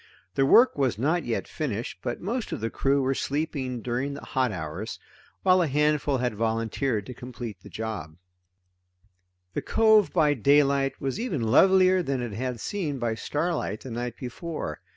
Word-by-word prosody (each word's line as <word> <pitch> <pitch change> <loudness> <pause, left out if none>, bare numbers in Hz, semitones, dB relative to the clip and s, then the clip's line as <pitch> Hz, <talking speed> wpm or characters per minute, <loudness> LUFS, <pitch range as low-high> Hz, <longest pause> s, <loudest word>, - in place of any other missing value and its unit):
The 135 +4 +2
work 245 - +6
was 130 -6 +1
not 155 +9 +1
yet 115 - -2
finished, 120 -9 -4
but 120 - -3
most 230 +6 -3
of - - -3
the 115 +1 -3
crew 140 0 +1
were 135 +1 +1
sleeping 135 -4 -2
during 130 +4 -2
the - - -9
hot 130 -3 0
hours, 90 +5 -5 0.5
while 185 -1 +5
a 170 - +2
handful 150 0 +2
had 125 -2 -1
volunteered 115 +1 -1
to 125 - -7
complete 120 -5 -8
the - - -12
job. 105 -9 -5 1.4
The - - -2
cove 220 -2 +4
by 155 -4 +3
daylight 140 +1 +3
was 135 +8 -3
even 200 - -2
lovelier 185 +9 +5
than 135 -6 -1
it 120 -4 -4
had 125 +2 -3
seemed 155 - -3
by 120 -2 0
starlight 145 - -2
the 130 - -8
night 120 0 -4
before. 130 - -5
135 Hz, 170 wpm, -26 LUFS, 115-150 Hz, 1.4 s, work